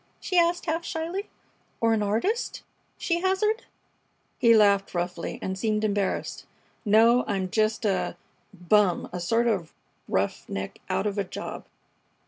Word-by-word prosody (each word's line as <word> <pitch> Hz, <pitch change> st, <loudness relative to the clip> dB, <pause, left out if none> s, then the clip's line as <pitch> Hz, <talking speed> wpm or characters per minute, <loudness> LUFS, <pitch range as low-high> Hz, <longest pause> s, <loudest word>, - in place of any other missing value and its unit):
she 370 Hz, -, -4 dB
asked, 345 Hz, 0 st, +3 dB
half 330 Hz, 0 st, -1 dB
shyly. 340 Hz, +5 st, -4 dB, 0.5 s
"Or 230 Hz, 0 st, +3 dB
an 220 Hz, -, +1 dB
artist?" 230 Hz, -, -1 dB, 0.3 s
she 340 Hz, -1 st, -1 dB
hazarded. 425 Hz, +5 st, +1 dB, 0.7 s
He 230 Hz, -1 st, +6 dB
laughed 200 Hz, -3 st, +4 dB
roughly 175 Hz, 0 st, -3 dB
and 190 Hz, -, -2 dB
seemed 215 Hz, +2 st, 0 dB
embarrassed. 205 Hz, -2 st, -1 dB, 0.4 s
"No, 230 Hz, +3 st, +5 dB
I'm 190 Hz, -3 st, -2 dB
just 215 Hz, 0 st, +1 dB
a 195 Hz, -2 st, 0 dB, 0.3 s
bum! 190 Hz, 0 st, +2 dB
A 180 Hz, -, -3 dB
sort 230 Hz, +7 st, +1 dB
of 190 Hz, -9 st, -1 dB, 0.3 s
roughneck 95 Hz, 0 st, -2 dB
out 190 Hz, +2 st, 0 dB
of 205 Hz, -1 st, -1 dB
a -, -, +1 dB
job." 185 Hz, -, -7 dB
215 Hz, 135 wpm, -26 LUFS, 195-320 Hz, 0.7 s, He